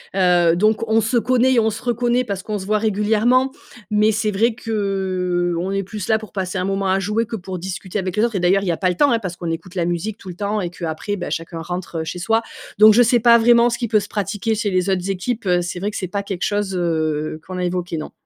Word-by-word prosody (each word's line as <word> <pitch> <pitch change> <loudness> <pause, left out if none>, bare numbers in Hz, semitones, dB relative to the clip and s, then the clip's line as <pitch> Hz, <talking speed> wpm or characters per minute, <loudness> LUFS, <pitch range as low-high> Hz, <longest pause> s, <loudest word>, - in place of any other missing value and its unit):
heu 175 -3 +4
donc 215 +4 +1
on 225 0 +4
se 225 +3 0
connaît 255 +2 +3
et 240 - +4
on 220 - +2
se 220 0 -6
reconnaît 245 +1 +1
parce 200 -5 -4
qu'on 210 -1 -3
se 190 - -7
voit 215 +2 +1
régulièrement. 220 +5 +2 0.4
Mais 210 +1 +4
c'est 215 0 0
vrai 220 +3 +1
qu'on 185 -5 -1
est 195 0 -1
plus 205 0 -6
là 220 -1 +3
pour 215 -1 -11
passer 185 -1 -3
un 185 - -1
moment 195 0 -1
à 190 +1 +2
jouer 210 +4 0
que 225 +1 -5
pour 185 -2 -6
discuter 185 +2 -4
avec 185 -2 -3
les 215 - +3
autres 230 -3 -3
et - - +1
d'ailleurs, 185 +3 +3
il - - -4
y 175 - +2
a 165 - -2
pas 185 - +1
le 180 - -1
temps, 285 +4 +3
hein, 230 - +2
parce 185 -5 -5
qu'on 170 -1 -5
écoute 170 +3 -6
la 175 -2 0
musique 175 +5 -2
tout 190 - -11
le 175 - -7
temps 205 +2 -2
et 175 - -3
qu'après, 170 +3 -4
bah, 180 -3 -5
chacun 165 0 -4
rentre, 175 -1 -5
heu, - - -3
chez 180 +2 -5
soi. 225 +5 +1 0.4
Donc 215 +1 +8
je 240 - +5
sais 240 +1 +3
pas 235 0 +6
vraiment 235 +1 +5
ce 235 - -2
qui 235 - -2
peut 215 -1 +3
se 205 - -6
pratiquer 205 +2 -2
chez 215 -1 -1
les 185 +1 +1
autres 190 0 -1
équipes, 215 +4 -3
heu, 180 -1 +2
c'est 175 +1 -4
vrai 205 +3 -2
que - - -5
c'est 185 - -3
pas 200 +2 -3
quelque 195 -3 -4
chose, 205 -2 -1
heu, 155 -3 -1
qu'on 185 0 -6
a 180 - -2
évoqué, 175 -2 -2
non. 155 - -6
195 Hz, 280 wpm, -20 LUFS, 180-220 Hz, 0.4 s, Donc